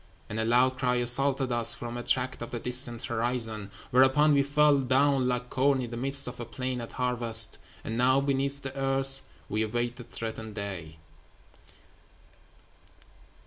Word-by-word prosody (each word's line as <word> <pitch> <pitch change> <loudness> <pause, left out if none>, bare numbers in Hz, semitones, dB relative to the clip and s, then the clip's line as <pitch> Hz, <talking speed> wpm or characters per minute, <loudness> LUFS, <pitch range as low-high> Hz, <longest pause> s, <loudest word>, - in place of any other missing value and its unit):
And 105 - -5
a 110 - -1
loud 125 +3 +1
cry 125 -2 -1
assaulted 130 +2 +3
us 120 -1 +5
from 120 0 -8
a 120 - -6
tract 125 +1 -2
of 120 - -7
the 120 - -6
distant 125 0 +3
horizon; 115 -3 -3 0.2
Whereupon 135 +4 +3
we 140 - +2
fell 145 0 +1
down 135 0 0
like 125 0 -4
corn 135 +1 0
in 120 -2 -6
the - - -7
midst 135 +3 +1
of 125 - -9
a 120 - -7
plain 125 +1 -6
at 115 - -10
harvest; 120 -3 +4 0.2
And 115 +1 -6
now, 130 +2 +2
beneath 140 0 -1
the 135 0 -7
earth, 135 0 +3 0.3
we 105 +1 -3
await 120 +2 -3
the 125 - -10
threatened 110 -2 -8
day.' 95 -7 -7
125 Hz, 165 wpm, -26 LUFS, 115-135 Hz, 0.3 s, us